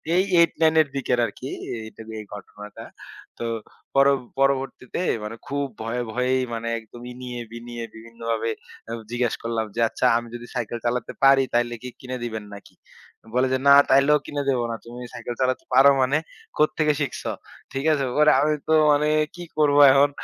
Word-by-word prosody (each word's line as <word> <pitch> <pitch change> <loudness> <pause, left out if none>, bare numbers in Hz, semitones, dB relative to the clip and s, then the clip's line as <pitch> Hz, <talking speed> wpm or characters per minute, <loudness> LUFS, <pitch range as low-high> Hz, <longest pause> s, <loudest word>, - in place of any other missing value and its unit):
এই 185 - +4 0.2
8-9 160 -1 +3
এর 150 - -1
দিকে 135 -2 -2
আরকি 125 +5 -7 0.3
এই 110 - -8
টাইমের 110 -1 -8
ঘটনাটা। 105 0 -10 0.6
তো 120 - -3 0.5
পর 135 0 +6 0.3
পরবর্তীতে 135 +1 0 0.2
মানে 105 +2 -5
খুব 140 0 -1 0.2
ভয়ে, 120 +2 -2
ভয়েই 125 +1 +1
মানে 115 0 -4
একদম 115 +2 -14
ইনিয়ে 125 -1 -7
বিনিয়ে 120 0 -7
বিভিন্নভাবে 115 0 -4 0.4
আ - - -5 0.2
জিজ্ঞেস 120 -1 0
করলাম 115 -1 -1
যে, - - -3
"আচ্ছা, - - -2
আমি 120 0 -5
যদি 120 0 -8
সাইকেল 120 -1 -3
চালাতে 120 0 -1
পারি 135 0 +6
তাইলে 120 0 +1
কি 125 - -6
কিনে 130 0 -5
দিবেন 110 -3 -5
নাকি?" 100 - -13 0.6
বলে 130 +1 +3
যে, - - +3
"না 140 - +9 0.2
তাইলেও 140 +2 +5
কিনে 145 -1 -3
দেব 130 -2 +2
না। 115 - -2
তুমি 120 +1 -9
সাইকেল 120 +1 -6
চালাতে 130 0 0
পারো 135 +2 +8
মানে 135 +4 +2 0.4
কোত্থেকে 150 0 +2
শিখছো?" 140 - -3 0.4
ঠিক 135 +2 -3
আছে, 140 -2 0
ওরে 150 0 +6
আমি 150 +1 +2
তো - - +4 0.2
মানে 145 +1 +3 0.3
কি 175 - -8
করব, 145 -2 +3
এখন 140 +2 +5
125 Hz, 170 wpm, -24 LUFS, 115-140 Hz, 0.6 s, না